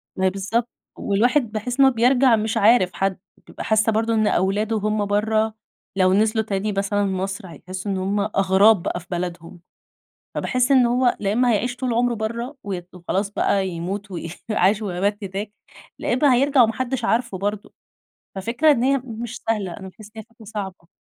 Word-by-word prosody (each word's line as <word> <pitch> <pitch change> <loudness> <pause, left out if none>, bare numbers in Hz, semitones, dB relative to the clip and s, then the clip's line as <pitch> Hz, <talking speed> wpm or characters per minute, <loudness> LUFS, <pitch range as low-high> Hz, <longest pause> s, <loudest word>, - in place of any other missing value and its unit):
ما 190 - 0
هي - - +5
بالضبط 205 +5 -2 0.3
والواحد 235 +4 +1
باحس 240 +5 -4
إنّه 270 -1 +7
بيرجع 250 +1 +4
مش 220 0 -1
عارف 205 -3 +4
حد، 195 -1 -1 0.3
بابقى - - -8
حاسّة 220 0 +2
برضه 225 +1 0
إن 215 -1 +2
أولاده 205 +5 +1
وهُم 215 0 0
برّه 215 +2 +1 0.4
لو 185 -1 +4
نزلوا 220 +2 +2
تاني 205 0 -2
مثلًا 200 +1 0
مصر 195 +1 -3
هيحسوا 185 +3 -7
إن 190 - -1
هُم 195 +2 -1
أغراب 195 -1 +3
بقى - - -2
في 180 - -17
بلدهم. 175 0 -5 0.8
فباحس 250 +1 0
إن 260 -3 +5
هو 245 +1 +2
لأ 200 -1 0
إمّا 245 +3 +2
هيعيش 245 +4 -1
طول 250 -1 -2
عمره 240 +1 +1
برّه 235 +5 -4
وي 190 -3 -4
وخلاص 185 +3 -2
بقى 195 -2 0
يموت 190 +4 -5
و 180 - -5 0.3
عاش 210 +1 +2
ومات 200 +1 -1
هناك، 200 +2 -5 0.5
لا - - -2
إمّا 260 +1 +4
هيرجع 275 +1 +4
وما 225 -1 +3
حدش 255 +1 -3
عارفه 235 -4 0
برضه 205 +2 -4 0.6
ففكرة 235 +11 +2
إن 255 -5 +2
هي 275 +2 +3
مش 235 -1 -6
سهلة 205 -5 -1
أنا 190 -2 -9
باحس 210 +3 -14
إن - - -5
هي - - -8
فكرة 230 0 -19
صعبة. 195 -5 -7
215 Hz, 185 wpm, -22 LUFS, 195-235 Hz, 0.8 s, إنّه